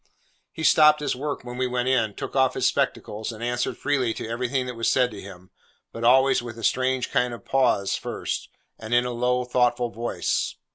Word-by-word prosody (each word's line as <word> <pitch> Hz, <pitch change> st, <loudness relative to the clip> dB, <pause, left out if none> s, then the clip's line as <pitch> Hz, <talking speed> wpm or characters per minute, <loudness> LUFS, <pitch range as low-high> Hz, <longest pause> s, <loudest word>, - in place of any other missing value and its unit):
He 160 Hz, -, -7 dB
stopped 150 Hz, -1 st, +6 dB
his 145 Hz, -3 st, -1 dB
work 145 Hz, +3 st, -4 dB
when 120 Hz, 0 st, -8 dB
we 130 Hz, 0 st, 0 dB
went 125 Hz, 0 st, -1 dB
in, 115 Hz, -5 st, +1 dB
took -, -, -6 dB
off 130 Hz, -1 st, +3 dB
his -, -, 0 dB
spectacles, 110 Hz, +3 st, -1 dB
and 115 Hz, 0 st, -9 dB
answered 120 Hz, 0 st, -1 dB
freely 130 Hz, -6 st, 0 dB
to -, -, -5 dB
everything 125 Hz, +3 st, -1 dB
that 125 Hz, -, -5 dB
was 115 Hz, -1 st, 0 dB
said 125 Hz, -1 st, +2 dB
to 105 Hz, -, -9 dB
him, 95 Hz, -2 st, -12 dB, 0.4 s
but 115 Hz, -, -7 dB
always 130 Hz, +3 st, +5 dB
with 120 Hz, -1 st, -8 dB
a 115 Hz, -, -9 dB
strange 130 Hz, +2 st, 0 dB
kind 125 Hz, -2 st, +1 dB
of -, -, -15 dB
pause 125 Hz, -7 st, +2 dB
first, -, -, -4 dB, 0.3 s
and 110 Hz, +2 st, -2 dB
in 120 Hz, 0 st, +3 dB
a 125 Hz, -, -2 dB
low, 125 Hz, +1 st, 0 dB
thoughtful 125 Hz, -1 st, +1 dB
voice. 120 Hz, +1 st, -2 dB
125 Hz, 205 wpm, -24 LUFS, 115-130 Hz, 0.4 s, stopped